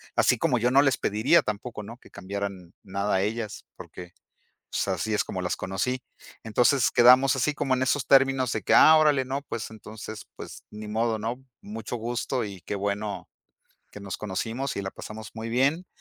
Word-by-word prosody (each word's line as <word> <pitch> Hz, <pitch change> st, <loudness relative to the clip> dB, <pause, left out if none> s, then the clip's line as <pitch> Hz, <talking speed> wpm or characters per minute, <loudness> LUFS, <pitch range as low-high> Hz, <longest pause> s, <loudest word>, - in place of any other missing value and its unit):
así 125 Hz, -, +4 dB
como 135 Hz, -4 st, +1 dB
yo 120 Hz, +2 st, +1 dB
no 135 Hz, +2 st, +6 dB
les 135 Hz, -2 st, +2 dB
pediría 110 Hz, +11 st, +3 dB
tampoco, 105 Hz, +1 st, -5 dB
¿no? 115 Hz, +4 st, -10 dB
Que -, -, -19 dB
cambiaran 100 Hz, -2 st, -6 dB
nada 100 Hz, +1 st, -2 dB
a 95 Hz, -, +2 dB
ellas, 110 Hz, +1 st, -3 dB
porque, 90 Hz, -1 st, -11 dB, 0.6 s
pues -, -, -1 dB
así 105 Hz, +3 st, -1 dB
es 105 Hz, -, +1 dB
como 95 Hz, -, -5 dB
las 90 Hz, -, -1 dB
conocí. 125 Hz, +7 st, -2 dB, 0.4 s
Entonces 115 Hz, +1 st, +3 dB
quedamos 130 Hz, +3 st, +6 dB
así 140 Hz, +4 st, +1 dB
como 135 Hz, -3 st, 0 dB
en 130 Hz, -, -1 dB
esos 130 Hz, +1 st, +1 dB
términos 135 Hz, -2 st, +4 dB
de -, -, -2 dB
que: -, -, 0 dB
"Ah, 160 Hz, -, +8 dB
órale, 150 Hz, -4 st, +3 dB
¿no? 135 Hz, +2 st, -3 dB
Pues 115 Hz, -4 st, -5 dB
entonces, 110 Hz, 0 st, -9 dB
pues -, -, -10 dB
ni 105 Hz, 0 st, -8 dB
modo, 110 Hz, +1 st, 0 dB
¿no? 115 Hz, +3 st, -3 dB, 0.2 s
Mucho 110 Hz, +3 st, -6 dB
gusto 120 Hz, +2 st, -2 dB
y 95 Hz, -3 st, -9 dB
qué 105 Hz, -, -4 dB
bueno, 100 Hz, +1 st, -3 dB, 0.6 s
que -, -, -10 dB
nos 100 Hz, -2 st, -6 dB
conocimos 115 Hz, +6 st, -3 dB
y 100 Hz, -, -2 dB
la 95 Hz, -, -5 dB
pasamos 110 Hz, 0 st, -9 dB
muy 110 Hz, 0 st, -5 dB
bien". 140 Hz, +9 st, +1 dB
110 Hz, 190 wpm, -26 LUFS, 100-130 Hz, 0.6 s, Ah